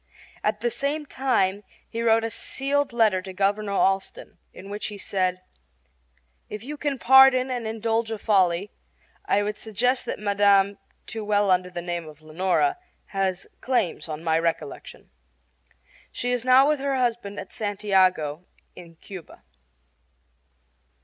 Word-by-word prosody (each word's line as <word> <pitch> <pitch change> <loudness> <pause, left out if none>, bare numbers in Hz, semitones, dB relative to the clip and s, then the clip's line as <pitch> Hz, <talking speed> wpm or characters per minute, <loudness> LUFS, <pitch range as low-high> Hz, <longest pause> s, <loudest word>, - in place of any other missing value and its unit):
At 210 0 -1
the 240 0 0
same 295 +4 -2
time 210 -8 0 0.2
he 230 - -5
wrote 225 -1 +3
a 225 - -2
sealed 280 +4 -1
letter 220 -5 +2
to 190 0 -9
Governor 200 +2 0
Allston 195 0 -1
in 195 +2 -11
which 205 +1 -4
he 210 - -7
said: 185 -2 -1 1.1
If 210 0 -7
you 295 +4 -6
can 290 -2 -2
pardon 265 0 +6
and 240 -3 -3
indulge 225 +1 -1
a 220 - -3
folly, 195 -2 +1 0.5
I 205 - +2
would 210 +1 -3
suggest 245 +4 -1
that - - -3
Mme., 200 -1 +3 0.3
too 220 -1 -6
well 205 0 +2
known - - +6
under 180 0 0
the 175 -1 -6
name 175 -2 -4
of 155 0 -14
Leonora, 185 - 0 0.3
has 190 -1 -1
claims 230 -11 -1
on 155 +1 -5
my 160 -1 +2
recollection. 165 -3 -4 1.0
She 245 - -3
is 245 -2 -1
now 255 +2 +6
with 300 -1 +1
her 275 0 -1
husband 235 -5 -1
at 195 - -9
Santiago, 185 -6 0 0.3
in 170 -2 -13
Cuba. 170 - -12
205 Hz, 150 wpm, -25 LUFS, 185-240 Hz, 1.1 s, pardon